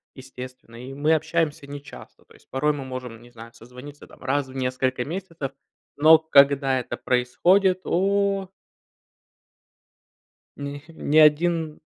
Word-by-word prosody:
естественно, 130 -2 -11
и 130 +1 -8
мы 150 +3 +1
общаемся 160 -1 -1
нечасто. 145 0 -11
То - - -21
есть - - -23
порой 150 +3 0
мы 140 -2 -6
можем, 125 -3 -7
не 120 0 -17
знаю, 115 0 -12
созвониться, 125 +5 -13
там, - - -19
раз 135 +1 -1
в 130 - -13
несколько 130 -1 -1
месяцев, 165 -4 -6 0.5
но 155 +2 +7
когда 140 -3 +4
это 125 - -6
происходит- 180 +10 +2
о! 195 +1 0 2.1
Ни 140 0 -7
ни 155 -2 +1
один 160 +1 +3
145 Hz, 130 wpm, -24 LUFS, 130-160 Hz, 2.1 s, но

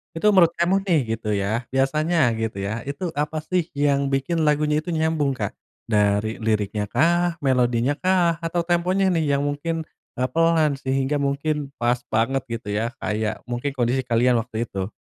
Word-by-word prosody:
itu 165 - -3
menurut 170 -3 +5
kamu 175 +3 +2
nih 170 -6 +3 0.2
gitu 115 - -9
ya 100 - -1 0.3
biasanya 155 +6 +1 0.2
gitu 110 -3 -3
ya - - -2 0.2
itu 145 +6 -5 0.2
apa 155 +1 -3
sih 180 -1 +2
yang 140 -1 +2
bikin 135 +5 0
lagunya 150 0 +2
itu - - -5
nyambung 160 -3 +1
Kak? 100 - -2 0.4
Dari 105 +1 +2
liriknyakah, 125 - +1
melodinyakah, 145 +8 +2
atau 170 +1 0
temponya 180 +3 +2
nih 165 -3 +1
yang 140 - +1
mungkin, 145 +3 -2 0.4
eee, 130 - +2
pelan 165 -3 +3
sehingga 135 +2 0
mungkin 140 +2 0 0.3
pas 120 +1 +2
banget 120 +5 +1
gitu 115 -2 -6
ya 110 - 0 0.2
kayak 110 0 -1 0.2
mungkin 125 +4 -2
kondisi 125 +2 +1
kalian 120 +1 +3
waktu 115 0 -4
itu? 95 +1 -4
140 Hz, 160 wpm, -23 LUFS, 115-165 Hz, 0.4 s, menurut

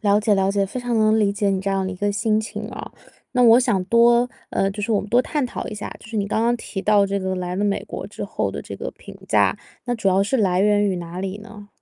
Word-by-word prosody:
了 205 -1 +3
解 210 -1 +2
了 195 0 +2
解， 200 0 +1
非 250 +6 -5
常 245 -1 -1
能 215 0 +4
理 205 -2 +2
解 200 0 0
你 190 -1 0
这 195 +1 -2
样 195 -1 0
的 190 - -3
一 - - -6
个 205 +2 0
心 215 +2 +1
情 220 - -6
啊。 - - -8 0.4
那 250 - +3
我 235 0 +7
想 230 -7 +1
多 235 +3 +4 0.2
呃， 195 - +1
就 205 +1 -6
是 225 - -2
我 205 - +2
们 205 - -8
多 240 +4 +4
探 295 +1 -1
讨 - - -6
一 215 - -5
下， 205 - -6
就 - - -14
是 225 - -6
你 200 -1 0
刚 220 +2 0
刚 240 +1 +2
提 195 -4 -6
到 205 -1 +4
这 200 0 -1
个 190 0 -2
来 180 0 -3
了 205 - 0
美 200 -1 0
国 - - -6
之 - - -7
后 - - -2
的 - - -5
这 - - -8
个 - - -5
评 - - -12
价， - - +3 0.3
那 245 - -1
主 220 -4 0
要 190 +1 +3
是 210 +7 0
来 185 -4 +2
源 205 0 +3
于 185 - -1
哪 175 +1 -6
里 195 +1 -4
呢？ 210 -1 -12
205 Hz, 315 characters per minute, -22 LUFS, 195-225 Hz, 0.4 s, 我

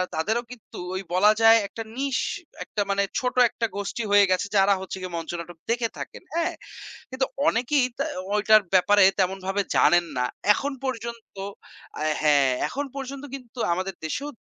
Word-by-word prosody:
তাদেরও 220 +9 0
কিন্তু 245 -3 -12 0.2
ওই 190 - -2
বলা 205 +4 +6
যায় 225 0 +8
একটা 225 +3 -7
niche 275 -1 -1 0.4
একটা 205 - -3
মানে 200 0 +2 0.2
ছোট 250 0 -2
একটা 230 - -2
গোষ্ঠী 205 +3 -3
হয়ে 200 -2 +6
গেছে 185 +2 +1
যারা 195 - +6 0.2
হচ্ছে 190 - -6
গিয়ে 180 -2 -5
মঞ্চ 165 0 -5
নাটক 170 0 -9
দেখে 235 -1 0
থাকেন, - - -8
হ্যাঁ? 335 -1 0 0.6
কিন্তু 260 0 0 0.2
অনেকেই 250 +2 +2
তা 280 - -1 0.3
ঐটার 215 +1 +5
ব্যাপারে 205 +2 +5 0.2
তেমনভাবে 190 +1 0
জানেন 175 0 +5
না। 125 - +1 0.3
এখন 285 +4 -3
পর্যন্ত 235 -4 -5 0.7
আ - - -1 0.2
হ্যাঁ, 145 -3 +4 0.2
এখন 285 +2 -3
পর্যন্ত 275 +1 -6
কিন্তু 250 -2 -11
আমাদের 185 +1 -3
দেশেও 280 - -3
215 Hz, 160 wpm, -25 LUFS, 185-250 Hz, 0.7 s, যায়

